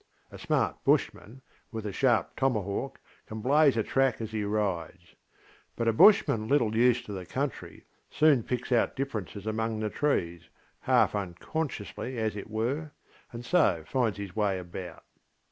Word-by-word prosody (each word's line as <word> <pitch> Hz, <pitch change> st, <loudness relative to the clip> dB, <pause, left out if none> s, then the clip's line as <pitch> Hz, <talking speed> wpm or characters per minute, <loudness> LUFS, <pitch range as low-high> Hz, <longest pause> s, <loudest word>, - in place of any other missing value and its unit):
A -, -, -11 dB
smart -, -, -1 dB
Bushman, 130 Hz, +5 st, 0 dB, 0.3 s
with 110 Hz, -2 st, -5 dB
a 105 Hz, -, -3 dB
sharp 120 Hz, +3 st, +1 dB
tomahawk, 125 Hz, 0 st, -1 dB, 0.3 s
can 110 Hz, -, -6 dB
blaze 140 Hz, +2 st, +4 dB
a 110 Hz, -, +2 dB
track 135 Hz, 0 st, +1 dB
as 110 Hz, -1 st, -5 dB
he 110 Hz, -1 st, -2 dB
rides. 95 Hz, -4 st, -3 dB, 0.6 s
But 115 Hz, -, -2 dB
a 115 Hz, -, +3 dB
Bushman 115 Hz, -, +5 dB
a -, -, -5 dB
little 115 Hz, -5 st, +2 dB
used 120 Hz, +1 st, +3 dB
to 105 Hz, -, -7 dB
the 95 Hz, -2 st, -5 dB
country 135 Hz, +9 st, -5 dB, 0.2 s
soon 150 Hz, -5 st, +4 dB
picks 125 Hz, +2 st, -4 dB
out 120 Hz, -, +2 dB
differences 110 Hz, -7 st, -5 dB
amongst 110 Hz, 0 st, -2 dB
the 105 Hz, -1 st, -2 dB
trees, 85 Hz, -, -1 dB, 0.3 s
half -, -, +3 dB
unconsciously 105 Hz, -, -4 dB
as 110 Hz, -2 st, -1 dB
it 105 Hz, -, -7 dB
were, 135 Hz, +8 st, -2 dB, 0.4 s
and 120 Hz, 0 st, -8 dB
so 115 Hz, -, +2 dB
finds 115 Hz, +1 st, 0 dB
his 100 Hz, -3 st, -7 dB
way 105 Hz, -3 st, +1 dB
about. 90 Hz, 0 st, -8 dB
110 Hz, 160 wpm, -28 LUFS, 100-130 Hz, 0.6 s, Bushman